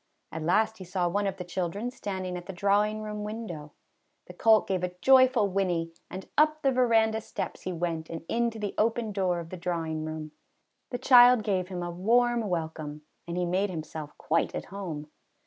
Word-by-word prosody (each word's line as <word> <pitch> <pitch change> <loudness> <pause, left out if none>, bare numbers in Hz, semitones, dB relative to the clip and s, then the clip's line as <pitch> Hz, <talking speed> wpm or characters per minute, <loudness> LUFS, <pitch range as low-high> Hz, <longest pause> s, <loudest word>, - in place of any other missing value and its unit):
At 160 - -5
last 215 +7 +1
he - - -7
saw 180 0 -1
one 200 +3 0
of 195 -1 -3
the 180 - -5
children 185 +6 -3
standing 190 -6 -4
at 175 0 -7
the 195 - -5
drawing 205 +3 +1
room 210 -1 -5
window. 210 -9 -6 0.5
The 180 - -11
colt 220 +4 +4
gave 185 -2 -1
a 180 0 -3
joy 260 +4 +7
ful 240 -5 +1
whinny, 180 -4 0 0.2
and 185 +1 -7
up 305 0 +3
the 270 - +4
veranda 225 -3 +3
steps - - -5
he 185 - -4
went 165 -2 -3
and 165 0 -6
into 235 -1 0
the 210 -2 -3
open 225 0 +1
door 185 -3 0
of 165 -1 -8
the 185 - -5
drawing 165 -3 -2
room. 155 -1 -5 0.6
The 245 - -3
child 245 -2 +7
gave 190 -3 0
him 180 -2 -5
a 175 - -4
warm 230 +4 +2
welcome 160 -3 -4 0.2
and 170 +1 -4
he 180 - +1
made 185 +4 0
himself 155 -3 -7
quite 165 +2 0
at - - -4
home. 165 -7 -5
190 Hz, 200 wpm, -28 LUFS, 170-220 Hz, 0.6 s, joy